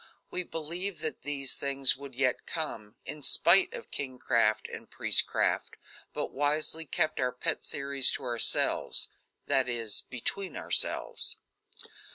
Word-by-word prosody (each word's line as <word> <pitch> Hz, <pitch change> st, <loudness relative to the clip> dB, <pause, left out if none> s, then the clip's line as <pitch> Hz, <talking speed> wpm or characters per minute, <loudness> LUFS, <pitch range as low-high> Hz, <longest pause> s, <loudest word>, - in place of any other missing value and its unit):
We 180 Hz, -, -2 dB
believed 175 Hz, +3 st, -5 dB
that 155 Hz, -, -3 dB
these 140 Hz, -2 st, -3 dB
things 140 Hz, -1 st, +3 dB
would 140 Hz, -1 st, -11 dB
yet 130 Hz, -1 st, 0 dB
come, 110 Hz, -10 st, -5 dB
in 150 Hz, 0 st, -5 dB
spite 175 Hz, +6 st, +5 dB
of -, -, -10 dB
kingcraft 115 Hz, -5 st, 0 dB
and -, -, -9 dB
priestcraft, -, -, +2 dB, 0.4 s
but -, -, -4 dB
wisely 150 Hz, +3 st, -1 dB
kept 155 Hz, +1 st, -1 dB
our 125 Hz, -1 st, +1 dB
pet 155 Hz, +5 st, -3 dB
theories 140 Hz, -2 st, +4 dB
to -, -, -4 dB
ourselves: 120 Hz, -2 st, +1 dB, 0.4 s
that 130 Hz, -2 st, +1 dB
is, 115 Hz, -3 st, 0 dB
between 175 Hz, -, -4 dB
ourselves. -, -, 0 dB
140 Hz, 130 wpm, -29 LUFS, 125-155 Hz, 0.4 s, spite